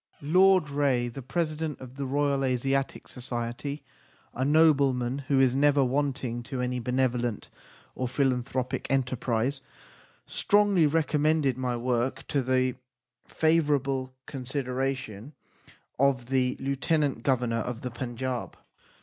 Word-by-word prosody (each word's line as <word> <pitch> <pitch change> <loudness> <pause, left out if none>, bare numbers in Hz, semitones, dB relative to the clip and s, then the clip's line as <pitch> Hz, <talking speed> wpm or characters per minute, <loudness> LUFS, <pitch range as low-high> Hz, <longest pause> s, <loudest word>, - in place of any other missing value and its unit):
Lord 180 0 +4
Reay, 135 -4 +1
the 130 +3 -8
President 155 +2 -2
of 130 -1 -10
the 140 0 -4
Royal 140 0 +1
Asiatic 135 +1 -1
Society, 125 +3 -4 0.5
a 130 - -2
nobleman 140 -4 +3
who 140 -2 +3
is 130 -2 +4
never 140 0 +4
wanting 130 -3 -1
to 125 +2 -6
any 125 0 -1
benevolent 125 -2 -1 0.4
or 130 - -2
philanthropic 130 -1 -1
enterprise, 130 0 0 0.6
strongly 205 -5 +3
recommended 150 -2 +2
my 125 -1 -2
work 120 +1 -1
to 140 - +1
the 130 0 +1 0.5
favourable 140 -5 +1
con 135 -3 -7
sideration 130 -2 -3 0.7
of 135 -3 +2
the 130 -1 +1
Lieutenant 140 0 0
Go 130 +1 +2
vernor 115 -1 -1
of 120 +1 -5
the 125 - -4
Panjab. 125 +1 -4
130 Hz, 120 wpm, -27 LUFS, 125-145 Hz, 0.7 s, Lord